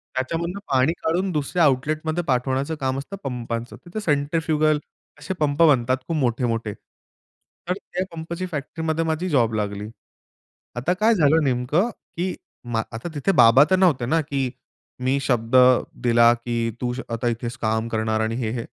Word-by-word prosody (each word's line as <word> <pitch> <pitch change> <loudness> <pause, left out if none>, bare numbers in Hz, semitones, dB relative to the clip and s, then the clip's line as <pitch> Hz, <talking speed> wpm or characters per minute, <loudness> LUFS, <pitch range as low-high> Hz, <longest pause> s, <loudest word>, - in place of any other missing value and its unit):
त्याच्यामधून 170 +8 -2
पाणी 135 +4 +2
काढून 180 +4 0
दुसऱ्या 160 +3 0
आउटलेटमध्ये 155 +5 +1
पाठवण्याचं 130 +4 0
काम 130 0 0
असतं 190 +8 -7
पंपाचं. 120 -2 -4
तर 175 - -17
ते - - 0
सेंट्रीफ्युगल 155 -1 +1 0.4
असे 190 - -4
पंप 150 +1 +1
बनतात 130 -4 +4
खूप 165 - -1
मोठे-मोठे. 115 -4 0
तर 180 - -11
त्या 185 -1 -5
पंपची 170 +3 -5
फॅक्टरीमध्ये 160 +2 -2
माझी 160 +3 -1
जॉब 120 -6 +2
लागली. 105 0 -3 0.9
आता 130 +9 0
काय 215 +4 +3
झालं 160 -1 +4
नेमकं 135 - +1 0.3
की 180 +1 -1 0.4
मा 110 - +2
आता 115 +10 -6
तिथे 145 +7 +1
बाबा 125 -2 +7
तर 185 - +5
नव्हते 160 -10 +3
ना, 160 +6 +2
की, 135 -3 -2 0.5
मी 130 +2 +1
शब्द 120 -1 0 0.5
दिला 120 0 +5
की 115 -1 -2
तू 120 -1 -1
श 130 - -5
आता 115 +1 -2
इथेच 120 0 -3
काम 110 +1 0
करणार 110 0 0
आणि 110 +1 -1
हे-हे, 115 -1 -2
135 Hz, 155 wpm, -23 LUFS, 120-160 Hz, 0.9 s, बाबा